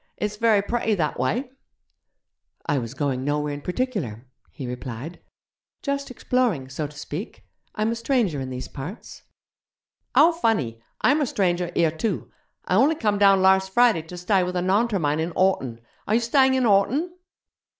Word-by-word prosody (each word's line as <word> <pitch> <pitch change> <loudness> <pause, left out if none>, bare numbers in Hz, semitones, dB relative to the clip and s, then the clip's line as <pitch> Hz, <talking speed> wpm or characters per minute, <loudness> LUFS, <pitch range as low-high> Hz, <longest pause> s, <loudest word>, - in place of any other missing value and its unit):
It's 210 0 -3
very 215 -3 +3
pretty 225 0 0
that 155 -8 -1
wye.' 230 - 0 1.2
'I 145 -3 +1
was 115 +1 -6
going 135 -2 -1
nowhere 150 +1 -1
in 145 - -6
particular,' 180 - -3 0.2
he 135 - -8
replied; 125 +5 -6 0.6
'just 280 0 -2
exploring, 240 - 0
so 145 +3 -3
to 145 +1 -15
speak. 150 - -7 0.3
I'm 215 +1 0
a - - -1
stranger 230 - 0
in 130 - -5
these 130 0 -5
parts.' 160 - -9 0.9
'How 325 +3 +7
funny! 215 - -1 0.2
Imer 290 -1 +3
stranger 180 -4 0
here 165 -2 +3
too. 180 +5 -3 0.3
I - - -1
only 285 +8 +4
come 210 -7 0
down 195 -2 +5
larse 190 0 +5
Friday 235 -4 +4
to 165 +3 -10
stye 185 +2 +2
with 180 0 -2
a 180 - +1
Naunter 205 +3 +2
mine 150 -1 0
in 165 +2 -2
Horton. 135 -11 +1 0.3
Are 215 - +2
you - - +4
stying 265 +2 +3
in 260 - +2
Horton?' 245 - +2
190 Hz, 165 wpm, -24 LUFS, 150-230 Hz, 1.2 s, How